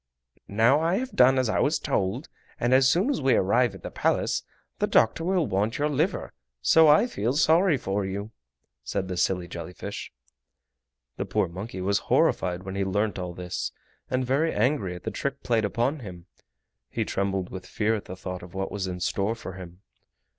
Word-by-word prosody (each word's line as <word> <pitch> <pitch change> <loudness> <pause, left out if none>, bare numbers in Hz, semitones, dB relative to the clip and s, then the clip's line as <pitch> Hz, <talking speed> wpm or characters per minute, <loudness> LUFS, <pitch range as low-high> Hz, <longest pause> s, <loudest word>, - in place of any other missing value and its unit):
"Now 115 +8 +4
I 165 +3 +2
have 255 +4 -2
done 130 +1 +5
as 130 -2 +2
I - - +1
was 150 +2 +2
told, 110 -3 -1 0.3
and 120 +1 +2
as 130 0 +6
soon 195 - +2
as 270 - -2
we 135 -1 +4
arrive 115 +2 +2
at 95 - -13
the - - -6
Palace - - 0 0.4
the - - +2
doctor 115 +8 +3
will 180 -2 +1
want 105 +1 0
your 150 +1 +1
liver, 155 +7 -1 0.3
so 160 - +6
I 150 +9 +6
feel 125 - -1
sorry 160 +2 +4
for 100 -3 -2
you!" 100 +3 -4 0.5
said 95 - -2
the 95 - -3
silly 90 0 0
jelly 85 0 -7
fish. - - -7 1.1
The - - -2
poor - - 0
monkey 95 +3 -6
was 100 +1 +1
horrified 90 0 +2
when 95 0 -6
he 100 0 -1
learnt 100 +1 -1
all 90 -1 -5
this, 90 0 -4 0.4
and 130 0 0
very 145 +6 +1
angry 110 -5 0
at 90 - -10
the - - -3
trick 140 0 -4
played 115 -3 +1
upon 120 +8 0
him. 90 -7 -9 0.6
He - - -2
trembled 95 -2 -2
with 95 -1 -7
fear 110 +1 0
at 105 - -3
the 90 - -7
thought 90 -1 -6
of 90 0 -12
what 95 0 -3
was 100 -2 -3
in 90 -1 -5
store 100 +5 0
for 95 - -8
him. 90 0 -11
105 Hz, 195 wpm, -26 LUFS, 95-135 Hz, 1.1 s, as